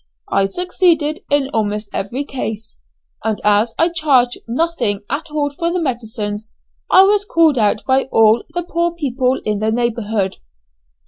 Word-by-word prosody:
I 195 - +3
succeeded 335 - +1
in 285 -2 +1
almost 210 -1 -1
every 235 +8 -3
case, 225 -5 -6 0.4
and 220 -2 -1
as 210 +2 +2
I 330 - +3
charged 275 -7 +2
nothing 240 -6 -1
at 310 +4 -3
all 295 -1 -1
for 335 +3 -1
the 360 - -1
medicines, 220 -6 -4 0.4
I 375 - +7
was 405 +1 +3
called 325 -9 +3
out 210 0 +1
by 265 0 +2
all 225 -2 +4
the 350 - -1
poor 340 0 -1
people 265 -4 0
in 210 -1 -1
the 215 +1 0
neighbourhood. 220 -4 -1
255 Hz, 150 wpm, -18 LUFS, 220-325 Hz, 0.4 s, I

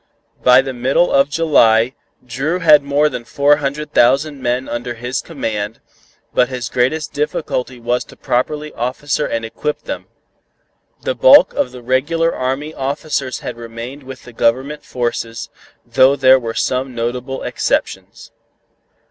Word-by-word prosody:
By 125 +1 +6
the 135 -1 -5
middle 130 +8 +1
of 140 +1 +3
July, 130 -7 +3 0.3
Dru 135 +8 -2
had 155 -4 +6
more 140 +2 +2
than 125 -5 -5
four 140 +5 +3
hundred 145 +1 -4
thousand 135 +4 +3
men 125 +1 -1
under 120 0 -4
his 120 +2 -3
command, 110 -8 -4 0.5
but 125 0 +3
his 125 -2 -4
greatest 130 +6 0
difficulty 145 -4 -3
was 120 +1 -1
to - - -15
properly 150 +5 -2
officer 145 +5 -2
and 115 0 -3
equip 150 +6 -4
them. - - -6 1.0
The - - 0
bulk - - +6
of 285 - -1
the 125 -1 -11
regular 150 +7 +1
army 135 +4 -3
officers 140 -1 -3
had 120 - -6
remained 115 +4 -8
with 130 -1 -10
the 120 - -13
Government 130 +6 0
forces, 115 -1 -4 0.3
though 130 +3 +4
there 130 -1 +5
were 115 -2 -5
some 130 0 -1
notable 125 +3 -3
exceptions. - - -3
130 Hz, 145 wpm, -17 LUFS, 120-145 Hz, 1.0 s, By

